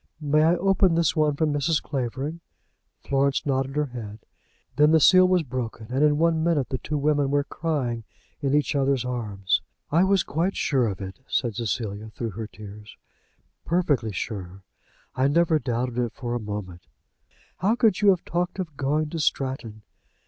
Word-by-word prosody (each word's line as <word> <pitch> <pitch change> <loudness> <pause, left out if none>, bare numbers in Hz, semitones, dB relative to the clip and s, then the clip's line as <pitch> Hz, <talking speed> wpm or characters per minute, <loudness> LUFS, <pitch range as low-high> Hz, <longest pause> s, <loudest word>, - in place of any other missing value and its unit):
"May 150 0 +2
I 165 +3 +4
open 190 -1 +3
this 165 -1 +2
one 150 -2 +2
from 150 0 +1
Mrs. 150 +2 +1
Clavering?" 135 +4 -4 0.6
Florence 140 0 +1
nodded 135 -1 -1
her 150 0 +1
head. 115 -5 -8 0.6
Then 150 +2 +5
the 160 - +6
seal 185 +4 +7
was 180 -2 +2
broken, 120 -4 -5
and 135 +3 +1
in 150 -1 +4
one 165 0 +2
minute 155 -7 +1
the 130 - -3
two 150 - -3
women 145 -1 +1
were 145 0 +2
crying 140 -7 -2 0.4
in 140 0 +1
each 150 - +1
other's 135 -2 +1
arms. 105 -6 -1 0.3
"I 165 +4 +4
was 195 -1 +3
quite 170 +6 -1
sure 130 -5 +1
of 100 -2 -4
it," 95 +3 -7
said 120 -4 0
Cecilia, 110 -1 -3
through 115 +1 -5
her 110 +3 -6
tears, 105 0 -12 0.7
"perfectly 150 -10 +1
sure. 95 -1 -6 0.5
I 130 +1 +2
never 160 +1 +3
doubted 125 -2 -2
it 120 -2 -1
for 120 -2 -4
a 120 - -1
moment. 100 -5 -7 0.7
How 210 +5 +2
could 220 -6 +2
you 205 - +6
have 185 -3 +2
talked 175 +2 -2
of 170 -6 -5
going 150 +3 0
to 165 - -3
Stratton?" 130 -7 -2
140 Hz, 175 wpm, -25 LUFS, 115-160 Hz, 0.7 s, seal